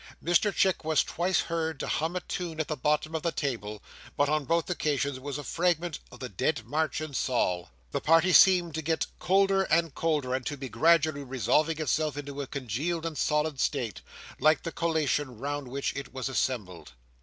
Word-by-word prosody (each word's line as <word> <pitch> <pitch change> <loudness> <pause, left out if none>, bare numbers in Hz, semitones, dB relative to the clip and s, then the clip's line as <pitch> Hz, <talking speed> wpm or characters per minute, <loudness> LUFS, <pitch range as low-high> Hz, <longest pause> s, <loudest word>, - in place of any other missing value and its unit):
Mr 175 +5 +3
Chick 190 -3 +1
was 155 -1 +3
twice 175 0 0
heard 160 -3 -2
to - - -3
hum 160 +3 -1
a 180 - -1
tune 170 -3 -5
at 155 - -1
the 155 - -2
bottom 150 +3 0
of 160 - -1
the 170 - 0
table, 110 -9 -4 0.3
but 145 - +3
on 155 -1 +1
both 170 +4 +1
occasions 145 -5 -1
it - - -12
was 140 0 -4
a 145 - -6
fragment 175 0 0
of - - -13
the 130 - -4
Dead 120 - -1
March 150 +3 -1
in 155 -2 -6
Saul. 90 -10 0 0.2
The - - -2
party 165 +3 +4
seemed 180 -3 +6
to 160 - -2
get 160 +1 0
colder 195 +1 +3
and 165 -4 +1
colder, 150 -6 0
and 130 0 -1
to 145 - -3
be 135 -1 -6
gradually 160 -2 +3
resolving 145 +5 +1
itself 155 0 0
into 145 -1 -5
a 140 - -5
congealed 140 - -3
and 165 -2 -3
solid 150 0 0
state, 115 -6 -1 0.4
like 155 +2 +4
the 165 - -4
collation 150 -6 0
round 145 +2 -4
which 135 +2 -3
it 140 -2 -6
was 130 0 -3
assembled. 90 - -2
150 Hz, 200 wpm, -28 LUFS, 135-165 Hz, 0.4 s, seemed